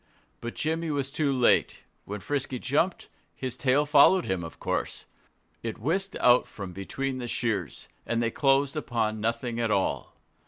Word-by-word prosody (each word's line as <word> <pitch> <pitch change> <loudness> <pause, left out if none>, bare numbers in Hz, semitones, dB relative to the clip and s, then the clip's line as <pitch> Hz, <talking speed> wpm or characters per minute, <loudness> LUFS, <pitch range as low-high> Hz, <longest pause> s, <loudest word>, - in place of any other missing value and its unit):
But 120 0 -6
Jimmy 160 +1 -1
was 140 -2 -2
too 150 -1 +1
late. 125 -3 +3 0.2
When 105 0 -6
Frisky 135 -1 -2
jumped, 145 +9 0 0.3
his 130 -2 -4
tail 140 +2 +2
followed 150 +5 +6
him, 95 -2 -1
of 80 - -9
course. - - -2 0.6
It 115 -2 -4
whisked 190 - -1
out 125 0 +5
from 95 -3 -8
between 130 +8 -3
the 120 - -4
shears; 105 - -2 0.2
and 115 - -1
they 115 -1 0
closed 135 +1 +2
upon 110 -7 -1
nothing 115 +1 -1
at 115 -1 +1
all. 100 -2 -1
125 Hz, 160 wpm, -27 LUFS, 115-145 Hz, 0.6 s, followed